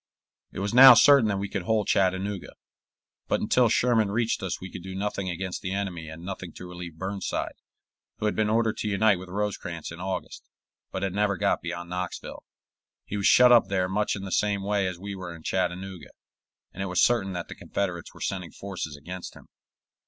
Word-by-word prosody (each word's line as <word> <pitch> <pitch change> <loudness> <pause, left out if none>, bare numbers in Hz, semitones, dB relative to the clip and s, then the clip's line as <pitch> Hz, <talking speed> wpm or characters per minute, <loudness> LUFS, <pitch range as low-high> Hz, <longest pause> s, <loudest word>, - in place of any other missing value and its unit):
It - - -11
was 100 +3 -2
now 130 0 +11
certain 140 -2 +7
that 100 -2 0
we 100 +1 -2
could 100 -1 -3
hold 105 +3 +1
Chattanooga; 95 +1 0 0.7
but - - +1
until 120 +2 +3
Sherman 115 -2 +3
reached 115 +2 0
us 95 -2 -3
we 95 0 -8
could - - -7
do 95 +1 -7
nothing 100 -1 -2
against 90 +1 -4
the 95 0 -3
enemy 90 -5 -4
and 80 +2 -9
nothing 95 -3 -6
to 90 - -9
relieve 90 -2 -8
Burnside, 95 +2 -3 0.6
who - - -3
had 105 - +1
been 110 -1 +1
ordered 110 0 +1
to - - -3
unite 105 -1 +3
with 95 0 -10
Rosecrans 90 -5 -4
in 85 - -9
August, 95 0 -5 0.5
but - - -3
had 95 -2 -1
never 100 -1 +1
got - - +1
beyond 85 0 -6
Knoxville. 90 0 -5 0.6
He - - -5
was 100 - +2
shut 125 0 +7
up 120 -2 +6
there 95 -2 0
much 105 +3 0
in 100 - -6
the 95 - -6
same 100 -1 +1
way 100 -1 +1
as 90 -2 -4
we 100 +2 -6
were 90 -3 -7
in 80 - -14
Chattanooga, 95 -1 -3 0.6
and 95 - -6
it 95 - -2
was 90 0 0
certain 105 -6 +3
that 90 -1 -4
the - - -7
Confederates 90 -4 -4
were - - -15
sending 90 -3 -3
forces 90 -7 -6
against 90 +5 -8
him. - - -16
95 Hz, 205 wpm, -26 LUFS, 90-105 Hz, 0.7 s, now